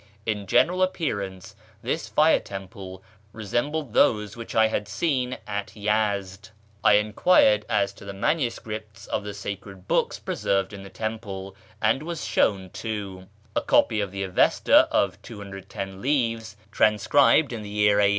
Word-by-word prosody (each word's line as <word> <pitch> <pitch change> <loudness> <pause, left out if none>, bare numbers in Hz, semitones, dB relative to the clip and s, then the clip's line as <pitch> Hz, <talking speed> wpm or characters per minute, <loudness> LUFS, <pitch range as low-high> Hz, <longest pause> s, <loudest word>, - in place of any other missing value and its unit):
In 105 -3 -2
Ljeneral 180 - +3
appearance 100 - -3 0.3
this - - -2
fire - - +4
teni])le 95 -1 -9 0.3
resembled 120 +5 -2
those 105 -3 +3
wliich 115 -1 -8
1 110 0 +5
liad 105 - -2
seen 130 +1 -1
at 100 -1 -4
Yezd. 105 -1 -1 0.3
I - - +6
enquired 105 - +4
as 100 - +1
to - - -14
the 100 - -5
manuscripts 110 -3 -3
of - - -2
the 105 0 -6
sacred 100 -1 -7
books - - +1
preserved 95 0 -1
in 100 - -8
the 95 - -10
temple, 100 -2 -5 0.2
and 110 +5 +2
was 165 0 -5
shown 95 -3 +1
two: 100 -4 -5 0.3
a - - +2
copy 105 - +3
of 100 - -2
the 100 0 -4
Avesta 95 -1 +4
of - - +1
210 95 -1 -8
leaves, 115 -6 -1
transcribed 120 +8 +4
in 115 - -5
the 105 - -8
year 105 0 +3
A. 100 -1 +5
105 Hz, 150 wpm, -25 LUFS, 100-115 Hz, 0.3 s, I